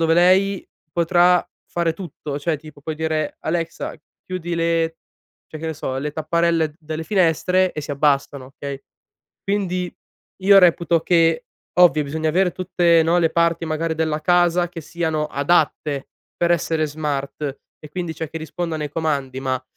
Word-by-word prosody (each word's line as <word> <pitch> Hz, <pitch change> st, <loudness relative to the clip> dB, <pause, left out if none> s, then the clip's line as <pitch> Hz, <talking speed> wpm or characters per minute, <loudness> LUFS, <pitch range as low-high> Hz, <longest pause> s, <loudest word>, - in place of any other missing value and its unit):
dove 165 Hz, 0 st, +3 dB
lei 185 Hz, +3 st, +3 dB, 0.3 s
potrà 175 Hz, +1 st, +4 dB, 0.2 s
fare 170 Hz, -1 st, 0 dB
tutto, 155 Hz, -4 st, -6 dB
cioè 155 Hz, +1 st, -1 dB
tipo 155 Hz, -1 st, -14 dB
puoi 155 Hz, +2 st, -4 dB
dire: 155 Hz, -1 st, -2 dB
"Alexa, 165 Hz, 0 st, -3 dB, 0.3 s
chiudi 175 Hz, -2 st, -4 dB
le" 165 Hz, -1 st, 0 dB, 0.5 s
cioè, 155 Hz, -, -8 dB
che 165 Hz, -, -4 dB
ne 160 Hz, -, -2 dB
so, 130 Hz, -1 st, -4 dB
"le 150 Hz, +1 st, -3 dB
tapparelle 160 Hz, 0 st, +1 dB
delle 155 Hz, 0 st, -5 dB
finestre" 185 Hz, 0 st, +2 dB
e 150 Hz, -, -4 dB
si 145 Hz, -, -7 dB
abbassano, 140 Hz, -2 st, +1 dB
okay? 140 Hz, -1 st, -6 dB, 0.6 s
Quindi 185 Hz, -3 st, -1 dB, 0.5 s
io 200 Hz, 0 st, +8 dB
reputo 170 Hz, -1 st, +4 dB
che 165 Hz, -2 st, +3 dB, 0.3 s
ovvio, 155 Hz, -4 st, +6 dB
bisogna 155 Hz, +2 st, -2 dB
avere 180 Hz, +3 st, +2 dB
tutte, 175 Hz, -2 st, +3 dB
no, 165 Hz, +2 st, +3 dB
le 165 Hz, -1 st, +2 dB
parti 170 Hz, 0 st, +1 dB
magari 160 Hz, +1 st, -1 dB
della 155 Hz, -1 st, -1 dB
casa 175 Hz, 0 st, +3 dB
che 165 Hz, -2 st, -8 dB
siano 160 Hz, -1 st, -2 dB
adatte 145 Hz, -1 st, 0 dB, 0.3 s
per 175 Hz, 0 st, +2 dB
essere 160 Hz, -2 st, +1 dB
smart, 145 Hz, -1 st, -3 dB, 0.2 s
e 150 Hz, -, -12 dB
quindi, 175 Hz, 0 st, -4 dB
cioè, 160 Hz, -, -5 dB
che 160 Hz, -, -5 dB
rispondono 160 Hz, -1 st, -4 dB
ai 150 Hz, -, -3 dB
comandi 140 Hz, -5 st, -2 dB
ma, 130 Hz, -1 st, -2 dB
165 Hz, 160 wpm, -21 LUFS, 150-175 Hz, 0.6 s, io